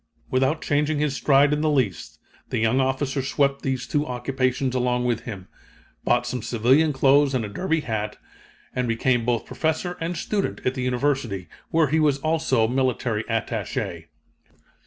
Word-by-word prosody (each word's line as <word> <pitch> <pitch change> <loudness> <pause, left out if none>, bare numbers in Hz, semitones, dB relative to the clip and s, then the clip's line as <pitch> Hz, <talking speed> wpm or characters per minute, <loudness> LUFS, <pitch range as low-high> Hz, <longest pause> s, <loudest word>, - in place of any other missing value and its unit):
Without 135 +5 +1
changing 150 +1 +1
his 145 -2 0
stride 140 +1 +4
in 150 - 0
the 155 - +2
least, 125 - -1 0.3
the - - -1
young 115 +4 +2
officer 135 +1 0
swept 140 +1 0
these 130 -2 -2
two 145 - 0
occupations 130 +1 -1
along 125 -1 0
with 120 -2 -1
him, 95 -6 -7 0.6
bought 120 0 +2
some 125 0 -3
civilian 130 +8 +3
clothes 140 0 +4
and 120 -4 0
a - - -4
derby 160 - -1
hat, 105 -4 -3 0.6
and 125 -1 -1
became 115 +1 +1
both 120 -2 0
professor 165 +3 -2
and 170 +1 -2
student 205 -2 -2
in 125 - 0
the 130 - -4
University, 125 -6 -1 0.2
where 160 -3 +2
he 160 +3 +2
was 150 -3 +3
also 155 -6 +1
military 125 -3 0
attaché. 115 -1 -3
130 Hz, 160 wpm, -24 LUFS, 120-145 Hz, 0.6 s, stride